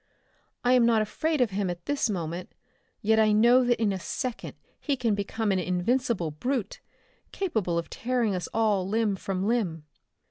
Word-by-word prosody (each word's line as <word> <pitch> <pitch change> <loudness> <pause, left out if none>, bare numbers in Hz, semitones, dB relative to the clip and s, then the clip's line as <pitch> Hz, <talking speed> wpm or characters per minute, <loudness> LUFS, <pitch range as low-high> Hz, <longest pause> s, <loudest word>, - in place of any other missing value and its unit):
"I 245 +1 +4
am 250 -1 +5
not 230 -2 +4
afraid 310 +7 -1
of 235 -4 +2
him 195 -1 -1
at 175 -1 -6
this 285 -5 0
moment, 175 -2 -4 0.5
yet 220 +1 +3
I 215 -1 +4
know 240 +4 +5
that 240 -2 +1
in 210 -3 +1
a 190 - -4
second 250 +6 -4 0.2
he 280 -3 -1
can 235 -4 +1
become 205 +1 -1
an 190 - +1
invincible 180 0 0
brute, 235 - -3 0.5
capable 220 - -1
of 170 - -2
tearing 240 -4 -1
us 180 -2 -3
all 210 -4 +1
limb 215 -1 +1
from 190 0 -3
limb." 185 -10 -1
215 Hz, 175 wpm, -27 LUFS, 185-245 Hz, 0.5 s, am